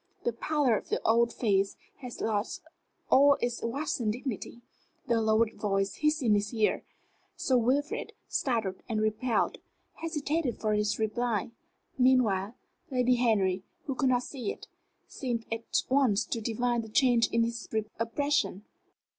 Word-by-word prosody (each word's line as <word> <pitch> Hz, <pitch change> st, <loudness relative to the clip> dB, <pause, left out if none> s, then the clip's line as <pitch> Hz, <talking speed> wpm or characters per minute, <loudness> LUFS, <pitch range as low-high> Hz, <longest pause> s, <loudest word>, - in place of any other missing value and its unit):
The 240 Hz, -, 0 dB
pallor 280 Hz, 0 st, +1 dB
of -, -, -5 dB
the -, -, 0 dB
old 235 Hz, +1 st, +3 dB
face 195 Hz, -4 st, +1 dB, 0.2 s
had 250 Hz, -3 st, -8 dB
lost 215 Hz, 0 st, -1 dB, 0.5 s
all 280 Hz, +1 st, +6 dB
its 240 Hz, 0 st, -2 dB
waxen 240 Hz, -2 st, -1 dB
dignity. 240 Hz, 0 st, -5 dB, 0.4 s
The 230 Hz, -1 st, +2 dB
lowered 220 Hz, +1 st, +2 dB
voice 195 Hz, -1 st, -1 dB
hissed 300 Hz, -1 st, +1 dB
in 225 Hz, -3 st, +4 dB
his 205 Hz, 0 st, +1 dB
ear. 220 Hz, -2 st, +1 dB, 0.5 s
Sir 260 Hz, -, +1 dB
Wilfrid, 275 Hz, +6 st, 0 dB
startled 220 Hz, -8 st, -1 dB
and 220 Hz, -2 st, 0 dB
repelled, 215 Hz, +3 st, 0 dB, 0.3 s
hesitated 310 Hz, -4 st, -2 dB
for 215 Hz, -1 st, 0 dB
his 210 Hz, 0 st, +1 dB
reply. 220 Hz, 0 st, -1 dB, 0.5 s
Meanwhile, 235 Hz, -5 st, +3 dB, 0.3 s
Lady 250 Hz, -1 st, +2 dB
Henry, 200 Hz, -6 st, +2 dB, 0.2 s
who 275 Hz, -, -2 dB
could 260 Hz, 0 st, +1 dB
not 250 Hz, -1 st, +2 dB
see 250 Hz, -6 st, -4 dB
it, -, -, -10 dB, 0.4 s
seemed 240 Hz, -4 st, -3 dB
at 225 Hz, 0 st, -1 dB
once 255 Hz, -6 st, +3 dB
to 230 Hz, -, -3 dB
divine 240 Hz, +2 st, 0 dB
the 220 Hz, -, -9 dB
change 240 Hz, 0 st, +4 dB
in 230 Hz, 0 st, +2 dB
his 230 Hz, 0 st, -4 dB
expression. 220 Hz, 0 st, -1 dB
230 Hz, 145 wpm, -29 LUFS, 215-255 Hz, 0.5 s, all